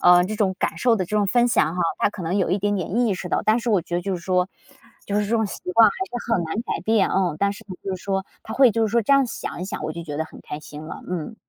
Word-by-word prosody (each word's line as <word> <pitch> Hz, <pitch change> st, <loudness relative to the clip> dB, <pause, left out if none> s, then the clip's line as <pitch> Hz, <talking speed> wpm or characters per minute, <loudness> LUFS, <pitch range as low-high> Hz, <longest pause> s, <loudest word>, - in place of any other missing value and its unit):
呃， 180 Hz, 0 st, +7 dB
这 215 Hz, +3 st, -3 dB
种 195 Hz, -3 st, +1 dB
感 -, -, -1 dB
受 245 Hz, -2 st, +4 dB
的 190 Hz, -4 st, -1 dB
这 210 Hz, +4 st, -2 dB
种 205 Hz, -1 st, +2 dB
分 240 Hz, +4 st, +3 dB
享 165 Hz, -7 st, +2 dB
哈， 180 Hz, -, 0 dB, 0.2 s
她 -, -, +3 dB
可 190 Hz, -, -8 dB
能 175 Hz, +5 st, 0 dB
有 185 Hz, -, +1 dB
一 190 Hz, -, +2 dB
点 205 Hz, +1 st, 0 dB
点 185 Hz, +3 st, -3 dB
意 210 Hz, -, +2 dB
识 180 Hz, 0 st, -6 dB
到。 -, -, 0 dB
但 220 Hz, +2 st, +4 dB
是 240 Hz, -, -3 dB
我 200 Hz, -5 st, +3 dB
觉 175 Hz, +2 st, -3 dB
得 -, -, 0 dB
就 190 Hz, +2 st, -2 dB
是 175 Hz, -, -6 dB
说， 180 Hz, 0 st, +1 dB, 0.6 s
就 205 Hz, -, -2 dB
是 210 Hz, -, 0 dB
这 -, -, -6 dB
种 225 Hz, -1 st, +2 dB
习 -, -, -7 dB
惯 225 Hz, +2 st, +7 dB
还 -, -, -5 dB, 0.2 s
是 235 Hz, -, -4 dB
很 180 Hz, -6 st, +2 dB
难 160 Hz, -, -4 dB
改 -, -, -3 dB
变， 220 Hz, -3 st, +3 dB
嗯， 180 Hz, -5 st, +1 dB
但 200 Hz, 0 st, +2 dB
是 200 Hz, -, -12 dB, 0.2 s
就 190 Hz, -1 st, -3 dB
是 -, -, -14 dB
说 195 Hz, -1 st, -1 dB, 0.2 s
她 220 Hz, -, -6 dB
会 265 Hz, -2 st, +6 dB
就 225 Hz, 0 st, +1 dB
是 -, -, -4 dB
说 235 Hz, 0 st, +3 dB
这 280 Hz, -, +2 dB
样 275 Hz, -1 st, +5 dB
想 230 Hz, -, -6 dB
一 -, -, -3 dB
想， 190 Hz, -, -5 dB
我 155 Hz, +1 st, -3 dB
就 170 Hz, +1 st, -7 dB
觉 150 Hz, -3 st, -5 dB
得 160 Hz, -, -1 dB
很 -, -, -13 dB
开 150 Hz, -, -7 dB
心 150 Hz, 0 st, -10 dB
了， 160 Hz, -, -8 dB
嗯。 180 Hz, +5 st, -4 dB
195 Hz, 345 characters per minute, -23 LUFS, 175-220 Hz, 0.6 s, 呃